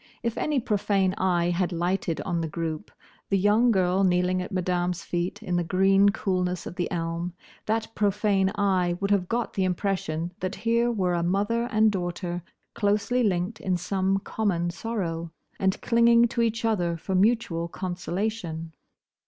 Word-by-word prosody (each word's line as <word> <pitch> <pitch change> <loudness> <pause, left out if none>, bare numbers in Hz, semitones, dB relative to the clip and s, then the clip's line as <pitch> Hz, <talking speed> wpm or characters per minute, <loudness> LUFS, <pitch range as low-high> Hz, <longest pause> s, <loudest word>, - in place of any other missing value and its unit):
If 235 -1 -1
any 300 -3 0
profane 200 -4 +1
eye 175 -2 +2
had 175 +1 0
lighted 175 -1 -1
on 175 -3 -1
the 165 - -2
group—the 165 +4 -5
young 210 +5 +4
girl 190 -2 +2
kneeling 180 0 +2
at 180 - -6
Madame's 180 -1 -1
feet 180 +4 -3
in 180 -4 -1
the 175 - +1
green 195 +3 +4
coolness 180 -2 -1
of - - -7
the 180 -2 -2
elm; 170 0 -3 0.3
that 220 +1 -1
profane 205 -2 +2
eye 185 -4 +1
would 200 0 -1
have 190 -3 +2
got 235 0 -1
the 195 - 0
impression 180 -3 -1
that 185 +2 -3
here 235 +1 +1
were 185 -6 0
a 170 - +1
mother 205 +7 +1
and 215 0 +4
daughter 175 -1 -3 0.3
closely 210 +5 +1
linked 195 0 0
in 185 -2 0
some 190 +2 0
common 190 -4 -1
sorrow, 170 -5 -4 0.3
and 190 0 +1
clinging 235 0 +5
to 235 - -1
each 225 0 0
other 175 -7 +1
for 190 +4 -4
mutual 190 -4 +2
consolation. 175 -2 -4
190 Hz, 160 wpm, -26 LUFS, 175-210 Hz, 0.3 s, clinging